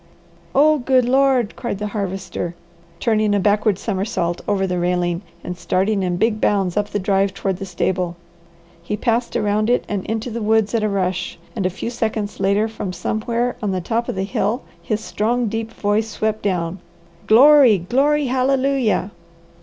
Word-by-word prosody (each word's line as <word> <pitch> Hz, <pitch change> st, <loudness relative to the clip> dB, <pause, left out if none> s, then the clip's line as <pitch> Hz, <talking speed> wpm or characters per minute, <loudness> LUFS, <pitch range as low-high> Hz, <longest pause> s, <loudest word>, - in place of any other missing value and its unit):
"Oh 305 Hz, +1 st, +5 dB
good 255 Hz, 0 st, +3 dB
Lord!" 260 Hz, -3 st, +2 dB
cried 235 Hz, -5 st, -4 dB
the 210 Hz, -, -4 dB
Harvester, 185 Hz, -4 st, -4 dB, 0.4 s
turning 215 Hz, -3 st, +2 dB
a -, -, +2 dB
backward 205 Hz, 0 st, +2 dB
somersault 190 Hz, -4 st, -2 dB
over 195 Hz, -2 st, +1 dB
the 180 Hz, -1 st, -1 dB
railing 175 Hz, 0 st, 0 dB, 0.2 s
and 180 Hz, -, -5 dB
starting 195 Hz, +3 st, 0 dB
in 180 Hz, -1 st, -1 dB
big 215 Hz, +2 st, +1 dB
bounds 195 Hz, -4 st, +1 dB
up 210 Hz, 0 st, 0 dB
the 205 Hz, -, -2 dB
drive 195 Hz, 0 st, +1 dB
toward 190 Hz, -2 st, -2 dB
the 195 Hz, 0 st, -6 dB
stable. 180 Hz, -1 st, -1 dB, 0.7 s
He 210 Hz, +5 st, -3 dB
passed 235 Hz, +1 st, 0 dB
around 215 Hz, -1 st, +1 dB
it 245 Hz, -, +2 dB
and 200 Hz, -3 st, -2 dB
into 225 Hz, +2 st, -3 dB
the 230 Hz, +1 st, -4 dB
woods 220 Hz, 0 st, +2 dB
at 230 Hz, -, +2 dB
a 215 Hz, -, +1 dB
rush 190 Hz, -2 st, -2 dB, 0.2 s
and 195 Hz, -5 st, 0 dB
a -, -, -1 dB
few 195 Hz, +5 st, -5 dB
seconds 220 Hz, -3 st, -3 dB
later 200 Hz, +3 st, +2 dB
from 210 Hz, -4 st, -5 dB
somewhere 230 Hz, +6 st, -2 dB
on 210 Hz, -, -1 dB
the 185 Hz, -1 st, -1 dB
top 230 Hz, +6 st, -2 dB
of -, -, -2 dB
the 190 Hz, -, -1 dB
hill 210 Hz, +5 st, -1 dB, 0.2 s
his 215 Hz, -1 st, -2 dB
strong, 235 Hz, +3 st, 0 dB
deep 225 Hz, +1 st, -3 dB
voice 215 Hz, 0 st, 0 dB
swept 215 Hz, 0 st, -2 dB
down, 180 Hz, -2 st, -1 dB, 0.5 s
"Glory, 260 Hz, -1 st, +7 dB
glory 275 Hz, -, +1 dB
hallelujah!" 260 Hz, -5 st, +1 dB
210 Hz, 175 wpm, -20 LUFS, 190-235 Hz, 0.7 s, Glory